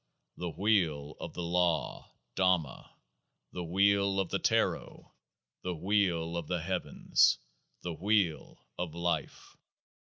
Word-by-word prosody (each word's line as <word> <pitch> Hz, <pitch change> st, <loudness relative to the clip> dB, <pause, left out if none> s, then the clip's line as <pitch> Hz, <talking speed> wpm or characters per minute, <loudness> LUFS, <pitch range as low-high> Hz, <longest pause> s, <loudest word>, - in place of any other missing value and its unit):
The 90 Hz, -, -4 dB
Wheel 80 Hz, -7 st, +1 dB
of -, -, -7 dB
the 90 Hz, -, -3 dB
Law 85 Hz, -1 st, 0 dB, 0.2 s
[Dhamma]. 90 Hz, -7 st, +1 dB, 0.6 s
The 90 Hz, -, -5 dB
Wheel 100 Hz, +2 st, +3 dB
of 95 Hz, -3 st, 0 dB
the -, -, 0 dB
Taro. -, -, 0 dB, 0.5 s
The 90 Hz, -1 st, -3 dB
Wheel 85 Hz, -3 st, +1 dB
of 85 Hz, -3 st, -4 dB
the 90 Hz, -3 st, -2 dB
Heavens. 95 Hz, 0 st, +2 dB, 0.5 s
The 90 Hz, -, -3 dB
Wheel 95 Hz, -1 st, 0 dB
of 85 Hz, -2 st, -3 dB
Life. 85 Hz, 0 st, -3 dB
90 Hz, 120 wpm, -31 LUFS, 85-95 Hz, 0.6 s, Wheel